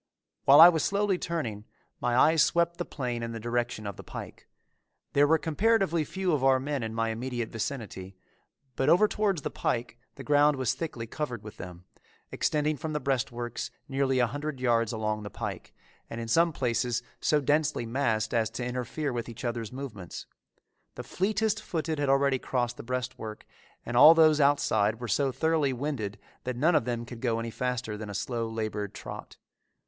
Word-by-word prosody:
While 140 +2 +8
I 165 - +12
was 160 -3 0
slowly 200 -2 +1
turning, 125 -12 -3 0.4
my 120 0 0
eyes 160 +4 +5
swept 170 0 +2
the 175 - -3
plain 125 -4 -4
in 115 0 -4
the 115 - -5
direction 120 -1 -2
of 100 -2 -5
the - - -9
pike. - - -9 0.7
There 145 +1 +5
were 160 +2 +5
comparatively 170 0 +1
few 190 +1 -2
of 140 -3 0
our 135 -1 +5
men 140 0 -2
in 110 -1 -4
my 115 0 0
immediate 120 0 -3
vicinity, 110 -6 -5 0.6
but 135 - +1
over 195 +5 +6
towards 200 -8 0
the - - -3
pike 120 0 -2 0.2
the - - -9
ground 145 0 +4
was 130 -1 +1
thickly 130 -5 -5
covered 120 -2 -5
with 110 +1 -10
them, 90 0 -9 0.5
extending 150 0 0
from 155 +3 -4
the 150 - 0
breastworks 125 -3 -2 0.2
nearly 135 -1 0
a 125 - +4
hundred 145 +3 -4
yards 115 -3 +2
along 110 -1 -2
the 105 - -6
pike, 105 -6 -6 0.4
and 115 - -6
in 115 - -5
some 165 +8 +3
places 120 -3 -1 0.2
so 150 - +2
densely 150 -2 +1
massed 115 -3 0
as 115 -3 +2
to 125 - -5
interfere 125 +3 -3
with 120 0 -4
each 120 +2 -8
other's 115 -3 -3
movements. 120 -10 -7 0.7
The - - -6
fleetest 215 +2 0
footed 160 -6 -3
had 145 -1 0
already 135 -1 +3
crossed 120 -2 -2
the - - -6
breastwork 125 -3 -5 0.4
and 120 - -4
all 155 +7 +9
those 155 -2 +5
outside 110 -6 +2
were 120 - -5
so 135 +6 +1
thoroughly 155 -1 +1
winded 125 -6 -3 0.3
that 125 -1 -3
none 160 +7 +3
of 135 - +3
them 120 -1 -2
could 120 -1 -10
go 115 -3 0
any 115 0 -4
faster 125 -3 -3
than 105 -1 -7
a 100 - -6
slow, 115 0 -2
labored 105 -3 -4
trot. - - -9
125 Hz, 185 wpm, -28 LUFS, 115-150 Hz, 0.7 s, I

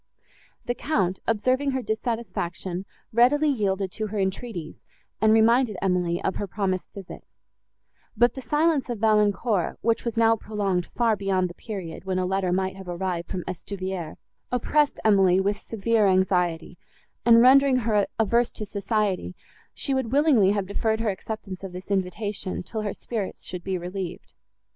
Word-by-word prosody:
The 245 - 0
Count, 190 - -1
observing 255 +5 +1
her 260 -1 -2
dissatisfaction, 205 -5 -3 0.3
readily 280 +6 +4
yielded 195 -7 0
to 215 +2 -3
her 210 +1 -5
entreaties, 190 -3 -3 0.4
and 220 0 +5
reminded 225 0 +4
Emily 180 -2 0
of 190 - -1
her 205 - -3
promised 185 -2 -2
visit; 195 -3 -9 0.9
but 240 +2 +4
the 265 - -7
silence 295 +3 +1
of 240 - -2
Valancourt, 210 -2 +2
which 230 0 +1
was 235 -2 -3
now 225 0 +5
prolonged 200 -5 -2
far 230 -2 +1
beyond 190 -3 0
the - - -11
period, 185 -5 -7
when 190 -1 -2
a 185 - 0
letter 190 -1 0
might 190 +1 0
have 190 -1 -10
arrived 175 -1 -3
from 185 -2 -3
Estuvière, 185 -2 -5 0.4
oppressed 285 +4 +1
Emily 190 -3 +5
with 200 +2 0
severe 225 -1 +1
anxiety, 180 -3 +1 0.4
and, 230 -1 +7
rendering 265 +2 +6
her 210 -3 +2
averse 235 +2 +2
to 215 - -5
society, 200 - -1 0.4
she 275 - -2
would 260 -4 -1
willingly 275 -8 +4
have 200 -1 0
deferred 220 +3 -1
her 220 -2 +1
acceptance 195 -1 -7
of 190 -2 -6
this 185 +2 -8
invitation, 195 0 -2
till 220 +4 -5
her 205 -2 -3
spirits 215 -5 -5
should 180 -1 -6
be 190 -1 -2
relieved. 180 0 -6
205 Hz, 160 wpm, -25 LUFS, 185-230 Hz, 0.9 s, and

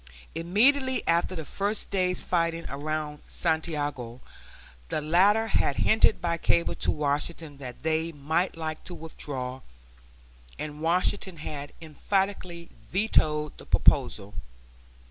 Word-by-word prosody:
Immediately 255 +10 +3
after 170 +2 +2
the 160 -3 -5
first 205 +5 -2
day's 185 -2 +1
fighting 165 -1 0
around 150 +1 -3
Santiago 145 -7 -2 0.7
the - - 0
latter 190 +8 +4
had 170 -9 +1
hinted 220 0 +4
by 170 -1 -1
cable 170 - +2
to - - -1
Washington 150 0 -2
that 125 -2 -8
they 160 +1 0
might 160 +5 -1
like 155 -1 -4
to 175 - -5
withdraw, 130 -5 -5 1.0
and 150 0 -6
Washington 180 +2 +1
had 145 -2 -6
emphatically 175 +1 -2 0.2
vetoed 155 -6 +2
the - - -11
proposal. 100 +1 +3
165 Hz, 115 wpm, -27 LUFS, 150-180 Hz, 1.0 s, latter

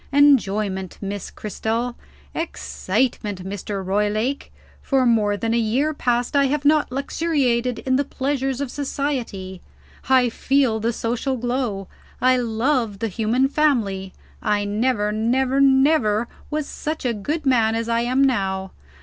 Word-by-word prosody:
Enjoyment, 210 -10 +2
Miss 200 -1 -5
Cristel. 225 +4 -3 0.4
Excitement, 215 - -2
Mr. 195 0 -4
Roylake. 210 +7 -1 0.3
For 270 -2 +2
more 210 -4 +2
than 225 +2 -1
a 235 - +2
year 255 +8 +1
past, 245 -1 0
I 280 0 +5
have 285 +1 -1
not 300 -2 +3
luxuriated 260 -4 0
in 260 0 +2
the 285 - +2
pleasures 270 -1 -2
of 275 -3 -3
society. 250 -10 -3 0.5
I 255 -2 +5
feel 255 -2 +1
the 230 +2 0
social 245 +3 -2
glow; 240 -5 -2 0.3
I 255 0 +4
love 235 -2 0
the 225 +2 -2
human 230 +6 +1
family; 225 -11 +1 0.3
I 205 -1 +1
never, 210 0 0
never, 255 +5 +1
never 265 -5 +4 0.2
was 305 -1 -2
such 310 0 -5
a 240 - +1
good 295 +9 -3
man 230 -4 +3
as 230 0 -2
I 230 0 +1
am 255 +3 +2
now. 190 -7 0
240 Hz, 140 wpm, -22 LUFS, 210-270 Hz, 0.5 s, I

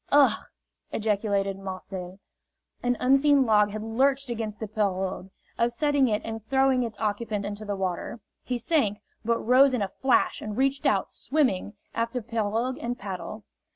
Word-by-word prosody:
"Ugh!" 285 -1 +5 0.5
ejaculated 200 -2 0
Marcel. 185 -1 -6 0.6
An 245 -1 +1
unseen 275 +1 +4
log 210 -2 +4
had 215 +1 -5
lurched 265 +4 +1
against 220 -2 -4
the 220 - -4
pirogue, 195 -3 -1 0.3
upsetting 270 +4 +2
it 210 -2 0
and 225 -1 -5
throwing 265 0 +3
its 230 -3 -3
occupant 210 -1 -2
into 205 +1 -5
the 205 -1 -2
water. 190 +4 -3 0.2
He 250 - -2
sank, 235 -5 +1 0.3
but 230 +1 +2
rose 255 +3 +5
in 220 - 0
a 195 - -2
flash 265 -1 +2
and 215 0 -5
reached 275 +1 +1
out, - - +1
swimming, 255 -9 0 0.2
after 230 +2 -1
pirogue 230 +2 -1
and 240 +1 -3
paddle. 195 +2 -6
225 Hz, 155 wpm, -27 LUFS, 205-255 Hz, 0.6 s, Ugh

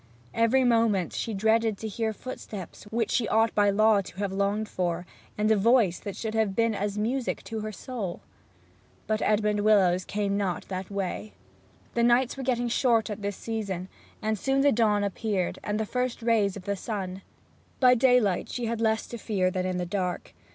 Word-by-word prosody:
Every 230 +3 +3
moment 225 -7 +2
she 225 - -3
dreaded 220 +1 +2
to 220 - -5
hear 220 +1 -2
footsteps 210 -5 -8
which 225 +1 -1
she 235 -4 +1
ought 225 0 +2
by 205 -1 +4
law 215 0 +4
to 180 - -12
have 200 -1 -2
longed 200 +2 0
for, 175 -2 -2 0.3
and 215 +1 +2
a - - +6
voice 215 -4 +3
that 200 - -6
should 220 -1 -4
have 220 -3 +1
been 230 +1 +2
as 205 0 -2
music 240 +4 -1
to 225 - -5
her 215 0 -4
soul. 210 -4 -5 0.8
But 215 0 -1
Edmond 210 0 +2
Willowes 195 -4 +4
came 200 -1 -1
not 190 -4 -2
that 185 -1 -4
way. 180 - -4 0.6
The 235 - +1
nights 240 +2 +3
were 270 - -6
getting 245 -2 0
short 235 -2 +2
at 210 - -5
this 200 -1 -3
season, 200 -5 -4 0.3
and 215 -1 0
soon 270 +4 +1
the 285 0 +5
dawn 210 -3 +2
appeared, 200 -2 -2
and 210 +1 -2
the 220 - 0
first 250 +1 -2
rays 215 -4 +2
of 195 - -9
the 200 - -1
sun. 190 -2 -5 0.6
By 250 -1 +6
daylight 245 -6 +3
she 245 - -3
had 230 0 -2
less 220 0 +1
fear 205 -5 -1
than 185 -1 -1
in 185 -1 -2
the 180 - -2
dark. 180 -1 -3
215 Hz, 190 wpm, -27 LUFS, 195-230 Hz, 0.8 s, a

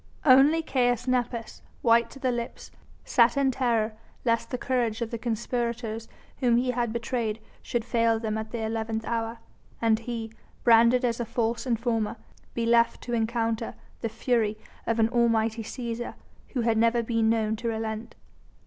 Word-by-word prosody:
Only 285 +4 +6
Caius 245 -4 +1
Nepos, 245 -2 -1 0.2
white 235 0 +4
to - - -12
the 260 -2 0
lips, 240 -1 -5 0.3
sat 235 -1 +4
in 275 -1 +3
terror 230 -4 +1 0.3
lest 230 -1 +1
the 250 - -2
courage 240 -4 0
of 225 - -6
the 235 - -3
conspirators 235 -1 -2 0.3
whom 240 -3 +3
he 250 +1 +1
had 240 -2 -1
betrayed 230 -1 -2 0.2
should 235 -2 -2
fail 230 -2 +2
them 220 -1 -2
at 220 0 -4
the 230 -1 -4
eleventh 225 0 -2
hour, 230 0 -2 0.4
and 225 -1 +3
he 230 -1 -5 0.3
branded 235 +2 +6
as 235 -1 0
a - - 0
false 230 +1 -1
informer 230 -2 0 0.4
be 235 - 0
left 235 0 +3
to 240 - -4
encounter 225 0 -1 0.2
the 230 - -2
fury 220 -1 0 0.3
of 230 - +1
an 225 -1 +4
almighty 230 -1 +2
Cæsar, 235 +1 -5 0.3
who 250 - -2
had 225 -1 +2
never 230 +1 +3
been 225 -1 +1
known 220 -1 +1
to 235 - -4
relent. 220 0 -3
230 Hz, 165 wpm, -27 LUFS, 225-240 Hz, 0.4 s, Only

